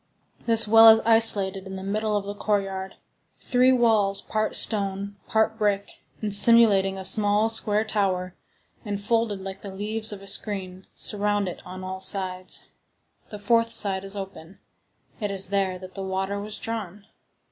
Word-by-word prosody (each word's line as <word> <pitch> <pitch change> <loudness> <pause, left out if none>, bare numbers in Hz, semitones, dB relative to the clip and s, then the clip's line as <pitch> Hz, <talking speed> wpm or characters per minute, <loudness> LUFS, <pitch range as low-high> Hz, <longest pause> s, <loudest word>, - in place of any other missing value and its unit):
This 230 -1 +5
well 225 +1 +7
is 220 0 +6
isolated 200 -4 +4
in 190 - -8
the 190 - -8
middle 210 +2 -2
of 205 - -4
the 200 - -6
courtyard. 195 -2 -3 0.4
Three 255 +1 +2
walls, 220 -6 +1
part 215 0 -3
stone, 200 -1 -1
part 220 0 0
brick, 205 -1 -2 0.2
and 210 -2 -2
simulating 205 -3 +5
a 190 - -6
small, 210 +2 +3
square 215 -1 0
tower, 185 -4 -2 0.5
and 205 -3 -5
folded 220 -1 -2
like 190 0 -8
the 200 - -9
leaves 215 +3 -3
of 200 -1 -9
a - - -12
screen, 190 -2 -2
surround 205 -1 -1
it 180 - -8
on 185 +1 -9
all 190 0 -7
sides. 185 -2 -1 0.6
The 210 - -9
fourth 230 +3 0
side 200 -4 0
is 195 +1 -1
open. 195 -2 -10 0.6
It 210 -3 -3
is 195 -1 0
there 195 -2 -1
that 185 0 -12
the 195 - -8
water 190 +1 -4
was 210 +1 -8
drawn. 210 -3 -7
200 Hz, 165 wpm, -24 LUFS, 190-215 Hz, 0.6 s, well